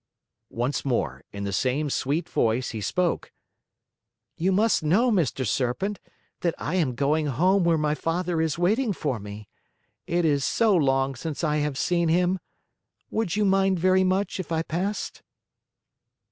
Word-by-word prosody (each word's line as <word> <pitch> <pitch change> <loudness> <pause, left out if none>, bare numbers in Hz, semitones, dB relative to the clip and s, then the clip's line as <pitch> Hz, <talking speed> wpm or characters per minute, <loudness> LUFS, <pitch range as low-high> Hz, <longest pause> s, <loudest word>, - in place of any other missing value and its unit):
Once 125 +4 -2
more, 130 -4 -1
in 100 0 -6
the 100 0 -3
same 130 +9 0
sweet 145 +4 -1
voice, 115 +3 0
he 110 -2 -5
spoke: 175 - -1 1.0
"You 185 +4 +1
must 215 +4 +3
know, 200 +11 +3
Mr. 155 - 0
Serpent, 125 - -1 0.4
that 170 -2 0
I 155 - -4
am 155 -9 +1
going 150 +4 +1
home 180 +8 +2
where 170 -1 +3
my 150 -1 +1
father 165 +1 -1
is 160 -1 0
waiting 210 +6 +1
for 140 -9 -2
me. 105 +1 -9 0.6
It 175 0 +1
is 145 -3 +2
so 220 +5 +3
long 135 -3 +2
since 150 +5 -5
I 150 -1 +1
have 150 -2 -1
seen 170 +1 +1
him! 180 +3 +2 0.7
Would 215 -6 -1
you 210 0 +2
mind 195 -1 +3
very 185 +2 +3
much 190 +2 0
if 175 -3 -6
I 160 0 0
passed?" 185 +6 -3
165 Hz, 160 wpm, -25 LUFS, 135-185 Hz, 1.0 s, must